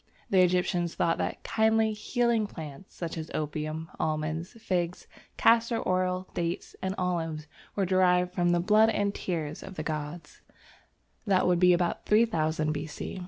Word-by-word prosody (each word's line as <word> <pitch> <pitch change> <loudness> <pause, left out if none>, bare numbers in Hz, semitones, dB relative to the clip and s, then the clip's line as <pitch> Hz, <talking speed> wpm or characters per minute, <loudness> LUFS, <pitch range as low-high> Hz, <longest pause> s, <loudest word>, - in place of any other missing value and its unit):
The 190 -2 +6
Egyptians 180 -1 +1
thought 165 - +1
that - - -3
"kindly, 220 0 +2
healing 230 0 0
plants," 155 -1 -10
such 165 -1 -4
as 160 - -6
opium, 155 +1 -3
almonds, 155 +3 -2
figs, 180 -6 -2 0.3
castor 230 0 +3
oil, 185 0 0
dates, 170 0 -3
and 190 +1 -2
olives, 165 -4 -2 0.3
were 195 - +1
derived 180 -1 +3
from 175 -1 +1
the 175 0 +3
"blood 215 +5 +5
and 205 -2 0
tears 160 -7 -3
of 190 - -9
the 155 - -4
gods"; 155 +1 -5 0.9
that 190 -2 +3
would 180 -1 +3
be 180 0 +6
about 175 0 -1
3000 160 -8 +2
B.C. 155 +4 -5
180 Hz, 150 wpm, -28 LUFS, 160-195 Hz, 0.9 s, The